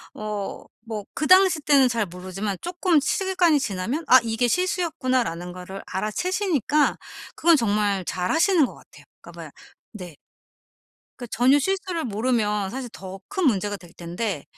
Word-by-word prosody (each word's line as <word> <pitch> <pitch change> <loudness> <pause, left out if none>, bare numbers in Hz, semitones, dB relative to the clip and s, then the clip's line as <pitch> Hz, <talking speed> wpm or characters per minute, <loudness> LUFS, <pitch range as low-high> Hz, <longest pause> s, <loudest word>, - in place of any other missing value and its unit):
어 210 -2 -5 0.2
뭐 220 -3 -6
그 305 - -2
당시 370 -4 +5
때는 280 -3 +4
잘 230 -3 0
모르지만 185 +3 -5
쪼끔 350 -2 +1
시간이 350 +1 +2
지나면 235 - -3
'아, 255 - +8
이게 230 +2 0
실수였구나.'라는 255 - -1
거를 185 +2 -8
알아채시니까 300 - 0 0.4
그건 335 0 +4
정말 205 -5 +1
잘하시는 320 - +2
것 - - -8
같아요. - - -18 0.2
그러니까 - - -13
뭐야 - - -9 0.4
네. 180 -6 -9 1.0
그 245 - -8
전혀 255 +5 +4
실수를 365 +1 -2
모르면 210 -3 0
사실 260 +1 -5
더 190 0 -9
큰 380 -2 -2
문제가 205 -4 +1
될 175 -3 -16
텐데 175 -1 -4
240 Hz, 315 characters per minute, -24 LUFS, 195-320 Hz, 1.0 s, 아